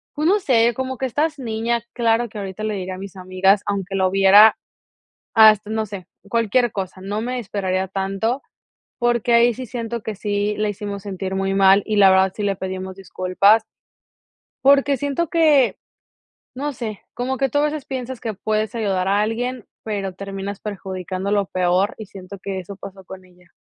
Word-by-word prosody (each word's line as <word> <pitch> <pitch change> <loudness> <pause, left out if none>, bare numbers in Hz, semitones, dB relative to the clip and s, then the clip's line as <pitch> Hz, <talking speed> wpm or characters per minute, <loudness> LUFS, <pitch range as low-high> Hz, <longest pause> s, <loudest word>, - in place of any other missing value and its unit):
Pues 305 +2 0
no 405 +4 +4
sé, 240 - +3
como 260 0 -3
que 265 - -2
estás 300 +4 -1
niña, 230 -1 -1
claro 235 0 +1
que 215 - -10
ahorita 195 +1 -6
le 215 -1 -1
diría 185 -1 -4
a - - -10
mis 195 -1 -9
amigas, 185 +2 +2
aunque 195 -1 -3
lo 190 -1 +2
viera 195 +3 +7 0.8
hasta, 215 -1 +6
no 220 0 -1
sé, 195 -3 -9 0.2
cualquier 230 +2 +2
cosa. 190 -2 -5
No 205 +3 -3
me 250 +2 -3
esperaría 190 -3 -2
tanto, 195 +7 -2 0.6
porque 240 -1 +1
ahí 235 0 +5
sí 255 - -6
siento 235 0 -5
que 220 - -4
sí 205 +1 -1
la 215 0 +1
hicimos 205 -1 -5
sentir 190 -1 -5
muy 195 0 0
mal 195 +1 +5
y 215 - -1
la 195 -2 +7
verdad 190 0 +4
sí 210 - -3
le 200 -1 0
pedimos 190 0 -5
disculpas 195 +3 +2 1.0
porque 280 0 +5
siento 285 +5 -2
que, 305 -6 +4 0.8
no 285 +3 -3
sé, 220 -5 -6
como 260 +2 -2
que 270 0 +1
tú 290 - -1
a 290 - +3
veces 300 -2 -2
piensas 260 -2 -5
que 225 -3 -4
puedes 215 +2 -2
ayudar 195 -5 0
a 200 +1 +2
alguien, 240 +2 -2 0.2
pero 200 -3 -3
terminas 195 +1 -6
perjudicándolo 195 0 -3
peor. 185 +3 +1
Y 220 - -7
siento 195 0 -10
que 190 0 -5
eso 185 +2 -8
pasó 195 0 -11
con 185 0 -11
ella. 180 -1 -24
205 Hz, 185 wpm, -21 LUFS, 190-235 Hz, 1.0 s, viera